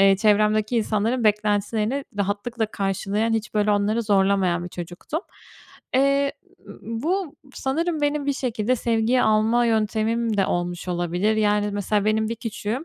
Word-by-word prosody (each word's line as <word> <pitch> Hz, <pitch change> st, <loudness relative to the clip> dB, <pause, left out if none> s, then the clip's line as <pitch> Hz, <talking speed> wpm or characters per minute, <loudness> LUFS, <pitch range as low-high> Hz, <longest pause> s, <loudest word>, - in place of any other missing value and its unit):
ııı, 195 Hz, 0 st, +6 dB
çevremdeki 215 Hz, +2 st, +2 dB
insanların 225 Hz, +2 st, 0 dB
beklentilerini 210 Hz, +4 st, +1 dB
rahatlıkla 210 Hz, +4 st, -1 dB
karşılayan, 200 Hz, +2 st, -1 dB
hiç, 220 Hz, -1 st, -2 dB
böyle, 210 Hz, 0 st, +2 dB
onları 210 Hz, +3 st, +1 dB
zorlamayan 195 Hz, -4 st, +2 dB
bir 175 Hz, -, -5 dB
çocuktum. 175 Hz, -, -6 dB, 0.7 s
Eee, 275 Hz, +1 st, +3 dB, 0.5 s
bu 305 Hz, +9 st, -2 dB, 0.2 s
sanırım 315 Hz, +4 st, -1 dB
benim 290 Hz, 0 st, 0 dB
bir 285 Hz, -, +2 dB
şekilde 250 Hz, -2 st, -1 dB
sevgiyi 230 Hz, +2 st, +1 dB
alma 220 Hz, +3 st, +3 dB
yöntemim 220 Hz, 0 st, 0 dB
de 195 Hz, -, +2 dB
olmuş 175 Hz, 0 st, -3 dB
olabilir. 180 Hz, +5 st, 0 dB
Yani, 210 Hz, -1 st, +2 dB
mesela, 205 Hz, 0 st, 0 dB
benim 215 Hz, 0 st, +1 dB
bir 230 Hz, -, -2 dB
küçüğüm 230 Hz, +4 st, -4 dB
215 Hz, 135 wpm, -23 LUFS, 205-235 Hz, 0.7 s, ııı